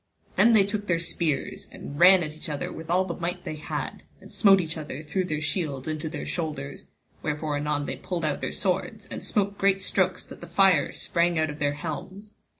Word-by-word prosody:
Then 235 - +6
they 205 -3 +6
took 205 0 -3
their 170 - +3
spears 165 -4 -2
and 145 +1 -8
ran 185 0 +8
each 155 +2 -7
at 150 - -1
other 140 - -4
with 160 0 -8
all 185 +2 +3
the 175 - -3
might 175 +2 -3
they 155 - -5
had, 150 - -4 0.2
and - - -14
smote 195 -3 +6
each 160 -3 -3
other 155 -2 -6
through 180 +5 -1
their 155 -3 -2
shields 150 -4 -2
into 155 0 -2
their 150 -2 -5
shoulders, 150 -5 -4 0.4
wherefore 150 0 -1
anon 145 0 -1
they - - -4
pulled 175 -3 -3
out 150 -2 -1
their - - -2
swords, 200 +3 -1
and - - -5
smote 200 -1 0
great 195 0 +4
strokes - - +1
that - - -12
the - - -8
fire 190 -7 +4
sprang 170 0 +1
out 155 -1 +1
of 150 - -9
their 145 -1 +1
helms. 185 +7 -6
165 Hz, 215 wpm, -27 LUFS, 150-190 Hz, 0.4 s, ran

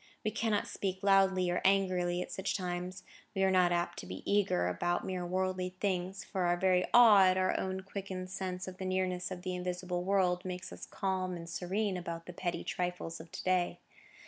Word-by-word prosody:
We 215 - +1
cannot 220 -2 0
speak 190 0 -3
loudly 190 -2 +4
or 175 - 0
angrily 185 -2 +2
at - - -11
such 190 +1 -1
times; 180 0 -4 0.3
we 195 - +2
are 190 - +4
not 180 -1 +4
apt 175 0 -1
to - - -8
be 90 +1 -7
eager 195 - +2
about 135 - -1
mere 185 -1 -3
worldly 185 0 -1
things, 190 -1 -1
for 185 -2 -2
our 175 0 +2
very 180 0 +3
awe 220 -5 +8
at 185 0 +4
our 185 0 +2 0.3
quickened 190 -2 -5
sense 185 -1 -4
of 185 0 -7
the 190 - -5
nearness 185 -1 -1
of 180 -1 -7
the 185 -1 -2
invisible 180 0 -3
world, 185 -2 +2
makes 185 0 -5
us - - -9
calm 185 -2 -2
and 170 0 -8
serene 190 +3 -1
about 170 -1 -5
the 180 - -8
petty 175 0 -3
trifles 180 -2 -3
of 165 +1 -11
to - - -6
day. 185 -1 +1
185 Hz, 200 wpm, -32 LUFS, 180-190 Hz, 0.3 s, awe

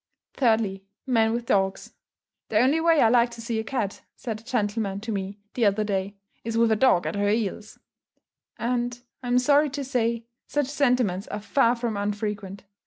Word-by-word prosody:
Thirdly, 220 -6 +1 0.2
Men 225 -4 +3
with 235 +1 -2
dogs. 195 -3 0 0.6
"The 215 - +1
only 270 +8 +4
way 330 -2 +4
I 225 - +5
like 240 0 +4
to 235 - -10
see 230 -1 -2
a - - -2
cat," 220 -4 -3
said 225 -4 -5
a - - -18
gentleman 210 -4 -1
to 220 +1 -4
me 200 0 -4 0.2
the 235 -4 +2
other 205 +2 +1
day, 200 -1 -2 0.3
"is 230 0 -2
with 230 -1 +4
a - - +4
dog 215 -6 +3
at - - -2
her 205 0 +1
heels;" 215 0 -2 0.8
and, 240 +1 -1 0.2
I'm 245 -1 +1
sorry 285 +4 +4
to 280 +1 -4
say, 235 -3 -1 0.2
such 290 -1 0
sentiments 245 -10 +1
are 210 - -4
far 235 +3 +2
from 235 -3 -3
unfrequent. 205 -1 -3
225 Hz, 180 wpm, -25 LUFS, 205-245 Hz, 0.8 s, I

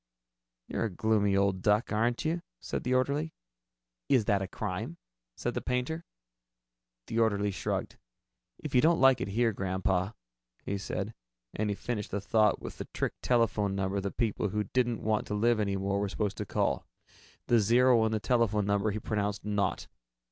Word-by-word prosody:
"You're - - -1
a - - -1
gloomy 100 0 +2
old 100 -1 +2
duck, 105 +4 +2
aren't 115 +5 +1
you?" 165 +2 0 0.2
said - - -4
the 125 +1 +1
orderly. 140 +5 0 0.7
"Is 125 -6 +4
that 100 -3 +2
a 95 - -2
crime?" 90 -4 -4 0.4
said - - -2
the - - -2
painter. 130 +7 -2 1.0
The 115 - -2
orderly 105 -2 +2
shrugged. 95 - -3 0.6
"If 150 - -7
you 125 - +6
don't 165 +2 +4
like 135 -1 +5
it - - -1
here, 115 +3 +1
Grandpa 95 +1 -1 0.2
" - - -44
he 100 - -2
said, 100 +2 -4 0.4
and 105 0 -1
he 100 - 0
finished 105 -1 -4
the 100 - -2
thought 105 +1 +3
with - - -8
the - - -4
trick - - -1
telephone 110 -5 +2
number 95 0 -1
that 100 0 -5
people 110 -2 0
who 105 +2 -1
didn't 120 +2 0
want 110 0 0
to 105 - -2
live 115 +2 +3
any 100 -2 0
more 100 +1 0
were 100 0 -1
supposed 105 0 -2
to 105 - -4
call. - - 0 0.6
The 120 - +4
zero 120 +2 +5
in 110 - +1
the 110 - 0
telephone 105 -2 +2
number 100 +1 +1
he 105 - -2
pronounced 105 -1 -2
"naught." 105 -1 0
105 Hz, 185 wpm, -30 LUFS, 100-120 Hz, 1.0 s, you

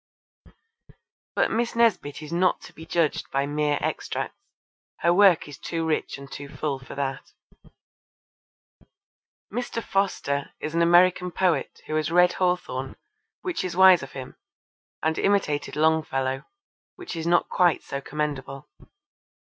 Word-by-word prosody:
But - - +2
Miss 235 +1 -1
Nesbit 205 -11 +1
is 155 +2 -7
not 180 +2 +2
to - - -13
be 160 +2 -12
judged 165 -2 0
by 135 +1 0
mere 145 0 0
extracts. - - -3 0.7
Her 170 - +4
work 190 -4 +5
is 145 - -10
too 165 -1 -3
rich 160 -3 -1
and 140 0 -12
too 140 0 -7
full 140 -2 -3
for 135 - -10
that. 135 -1 -4 2.2
Mr. 240 -1 -3
Foster 165 -8 -1
is 155 - -5
an 170 - +2
American 180 +1 +4
poet 175 -5 0
who - - -5
has 155 0 0
read 180 +1 +5
Hawthorne, 180 -8 -1 0.5
which 365 -2 -2
is 180 -1 -4
wise 190 -2 +8
of 140 - -9
him, 130 -2 -8 0.7
and 160 0 +1
imitated 170 -8 +1
Longfellow, 145 -4 +1 0.5
which 365 - -7
is 165 0 -3
not 175 0 +3
quite 175 -3 +2
so 140 - -5
commendable. 140 -2 -4
160 Hz, 140 wpm, -25 LUFS, 140-180 Hz, 2.2 s, wise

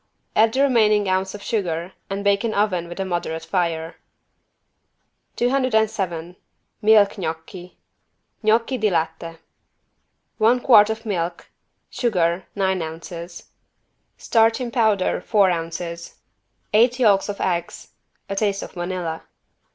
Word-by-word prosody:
Add 220 +1 +4
the 270 - +3
remaining 215 -6 +3
ounce 190 +1 0
of 205 - -10
sugar 180 -4 -2 0.2
and 195 +1 -3
bake 200 +1 +2
in 225 -2 -1
oven 185 -5 0
with 175 +2 -9
a 195 - -1
moderate 175 -3 -3
fire. 165 -3 -2 1.4
207 220 -9 0 0.5
MILK 210 -1 +5
GNOCCHI 175 +2 -6 0.7
(Gnocchi 230 +4 +2
di 215 -1 +2
latte) 165 -1 -2 1.0
One 230 +3 +4
quart 220 -4 +6
of 220 +1 -4
milk. 175 -4 -3 0.4
Sugar, 185 -8 0
nine 190 -2 0
ounces. 170 +2 -8 0.7
Starch 225 +1 +2
in 245 -2 -4
powder, 220 -6 +1
four 200 -4 +3
ounces. 170 0 -5 0.6
Eight 235 +3 +4
yolks 210 -6 +3
of 200 - -5
eggs. 175 -2 -3 0.4
A 195 - -4
taste 200 -1 0
of - - -9
vanilla. 175 -2 -4
195 Hz, 120 wpm, -22 LUFS, 170-220 Hz, 1.4 s, quart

